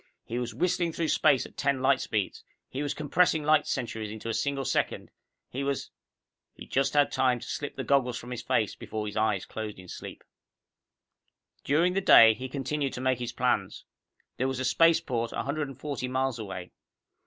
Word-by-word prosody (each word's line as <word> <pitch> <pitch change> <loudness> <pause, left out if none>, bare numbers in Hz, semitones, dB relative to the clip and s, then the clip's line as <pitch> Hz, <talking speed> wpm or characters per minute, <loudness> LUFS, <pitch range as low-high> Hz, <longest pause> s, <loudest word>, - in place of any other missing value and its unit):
He 120 +2 -3
was 120 - -4
whistling 175 -2 0
through 165 -1 -1
space 145 -5 +3
at - - -13
ten 140 -2 0
light 135 0 +3
speeds. 105 -4 -2 0.2
He 135 - -5
was 145 -1 -2
compressing 155 +1 +2
light 155 0 +3
centuries 115 -5 -3
into 110 +2 -6
a - - -1
single 140 +2 -1
second. - - -1 0.4
He 135 +2 -3
was 140 0 -2 0.6
He - - -10
had - - -24
just 135 0 +1
time 130 -4 +3
to - - -9
slip 145 - -4
the - - -4
goggles 125 -4 +2
from 120 +1 -9
his 125 -1 -4
face 110 -2 0
before 110 -1 -5
his 105 - -6
eyes 110 -3 +1
closed 110 -1 -6
in 95 0 -12
sleep. - - -9 1.4
During 165 +6 +2
the 195 - +1
day, 115 -11 +8
he 130 +4 -7
continued 140 +1 -2
to 125 - -5
make 130 -1 +1
his 120 -1 -3
plans. - - -1 0.5
There 130 - 0
was 130 -1 -2
a 130 - -1
spaceport 135 -5 +2
a - - -2
hundred 145 +1 -2
and 135 - -11
forty 140 -4 -3
miles 130 -1 -1
away. 95 -4 -6
130 Hz, 195 wpm, -28 LUFS, 115-145 Hz, 1.4 s, day